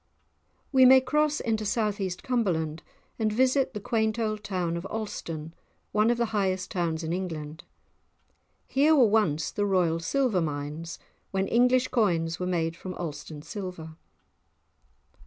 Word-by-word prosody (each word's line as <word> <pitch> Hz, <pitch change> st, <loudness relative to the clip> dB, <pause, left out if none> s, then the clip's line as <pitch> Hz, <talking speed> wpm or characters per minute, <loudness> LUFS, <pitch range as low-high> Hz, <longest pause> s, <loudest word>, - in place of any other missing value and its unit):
We 260 Hz, -2 st, +6 dB
may 260 Hz, +1 st, +9 dB
cross 300 Hz, +2 st, +1 dB
into 220 Hz, -1 st, -1 dB
south 210 Hz, -1 st, 0 dB
east 185 Hz, -2 st, -3 dB
Cumberland 170 Hz, -11 st, -1 dB, 0.4 s
and 215 Hz, -1 st, +1 dB
visit 260 Hz, +2 st, +2 dB
the -, -, -2 dB
quaint 220 Hz, +1 st, 0 dB
old 215 Hz, -2 st, -2 dB
town 180 Hz, -4 st, -2 dB
of 170 Hz, -, -4 dB
Alston, 165 Hz, -8 st, -5 dB, 0.4 s
one 215 Hz, +2 st, +3 dB
of 240 Hz, -, +2 dB
the 240 Hz, -, +1 dB
highest 190 Hz, -2 st, 0 dB
towns 170 Hz, -3 st, -1 dB
in 160 Hz, +1 st, -2 dB
England. 160 Hz, -3 st, -5 dB, 1.0 s
Here 295 Hz, +4 st, +3 dB
were 265 Hz, -5 st, +6 dB
once 190 Hz, -9 st, +1 dB
the 205 Hz, -, -1 dB
royal 175 Hz, -4 st, +2 dB
silver 225 Hz, +1 st, +1 dB
mines, 150 Hz, +2 st, -4 dB, 0.3 s
when 195 Hz, 0 st, -1 dB
English 250 Hz, +2 st, +3 dB
coins 170 Hz, -7 st, +1 dB
were 180 Hz, -, -2 dB
made 165 Hz, -2 st, -1 dB
from 185 Hz, +1 st, -7 dB
Alston 155 Hz, -2 st, -6 dB
silver. 180 Hz, -6 st, -7 dB
195 Hz, 145 wpm, -27 LUFS, 165-230 Hz, 1.0 s, may